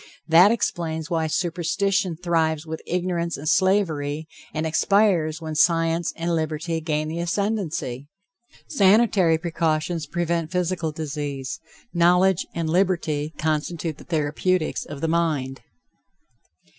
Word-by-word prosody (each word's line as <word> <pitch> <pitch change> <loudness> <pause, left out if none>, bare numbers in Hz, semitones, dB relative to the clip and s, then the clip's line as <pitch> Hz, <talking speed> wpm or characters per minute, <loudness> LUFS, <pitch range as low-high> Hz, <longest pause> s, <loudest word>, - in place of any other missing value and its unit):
That 170 +4 +7
explains 170 -7 -2
why 160 -1 +1
superstition 180 +2 0
thrives 165 -3 0
with 160 0 -6
ignorance 175 -1 -1
and 150 - -7
slavery, 160 -5 +1 0.2
and 155 +1 -2
expires 165 -1 +2
when 160 -1 -5
science 165 +1 +2
and 170 +1 -2
liberty 160 +1 -2
gain 155 -1 -1
the 160 +2 -4
ascendency. 170 - -2 0.6
Sanitary 195 - +4
precautions 160 -1 -1
prevent 170 0 -1
physical 180 -3 -1
disease; 145 -3 -4 0.3
knowledge 180 +1 +3
and 165 -1 -1
liberty 160 -4 0
constitute 155 +1 -2
the - - -11
therapeutics 160 +2 -1
of 145 -1 -8
the 165 - 0
mind. 155 -6 -1
165 Hz, 115 wpm, -23 LUFS, 155-180 Hz, 0.6 s, That